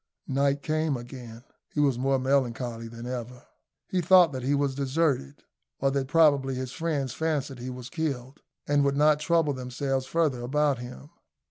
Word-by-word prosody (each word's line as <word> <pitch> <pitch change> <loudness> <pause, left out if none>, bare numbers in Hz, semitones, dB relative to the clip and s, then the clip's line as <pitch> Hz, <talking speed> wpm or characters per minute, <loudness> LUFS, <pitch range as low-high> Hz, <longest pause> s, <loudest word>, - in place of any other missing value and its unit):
Night 140 +1 +1
came 155 -2 0
again. 120 -1 -10 0.3
He - - -4
was 140 -4 +2
more 135 +1 +2
melancholy 125 -3 -1
than 115 +1 -9
ever. 125 0 -6 0.4
He 185 - 0
thought 180 -1 +6
that 130 -2 -4
he 135 +3 +1
was 140 -1 0
deserted, 135 - -1 0.4
or 135 0 +2
that 135 -1 -1
probably 140 -3 +4
his 130 0 -4
friends 150 -7 -2
fancied 145 -5 -2
he 125 +2 -5
was 125 -1 -7
killed, 140 -4 -3 0.3
and 145 0 +3
would 140 0 +1
not 150 0 +4
trouble 165 -2 +2
themselves 130 +1 -3
further 150 -7 +1
about 140 +1 +1
him. 120 - -9
135 Hz, 165 wpm, -27 LUFS, 125-150 Hz, 0.4 s, thought